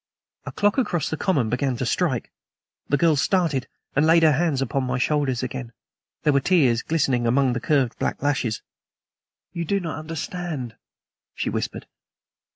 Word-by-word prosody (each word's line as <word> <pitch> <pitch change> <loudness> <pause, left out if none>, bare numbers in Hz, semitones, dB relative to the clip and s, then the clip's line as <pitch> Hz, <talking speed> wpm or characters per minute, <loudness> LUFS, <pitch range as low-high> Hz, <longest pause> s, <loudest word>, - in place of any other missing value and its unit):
A - - -3
clock 205 +5 +2
across 175 - 0
the - - 0
common 155 - +1
began 125 +2 -1
to 125 - -2
strike. 130 -2 0 0.6
The 145 - +3
girl 165 0 +4
started 155 -3 +1 0.3
and 145 - +4
laid 165 +1 +5
her 160 - +6
hands 150 -1 +1
upon 135 +1 -1
my 125 -1 -1
shoulders 130 -2 0
again. 125 -1 -5 0.5
There 150 - +3
were 140 - +4
tears 135 -7 +3
glittering 135 -7 +1
among 130 +1 +3
the 115 - -1
curved 130 -1 +1
black - - -2
lashes. 135 -6 0 0.9
"You 170 -1 -2
do 200 +5 0
not 165 -5 -4
understand," 155 -5 -5 0.6
she - - -2
whispered. - - -3
145 Hz, 160 wpm, -24 LUFS, 130-165 Hz, 0.9 s, her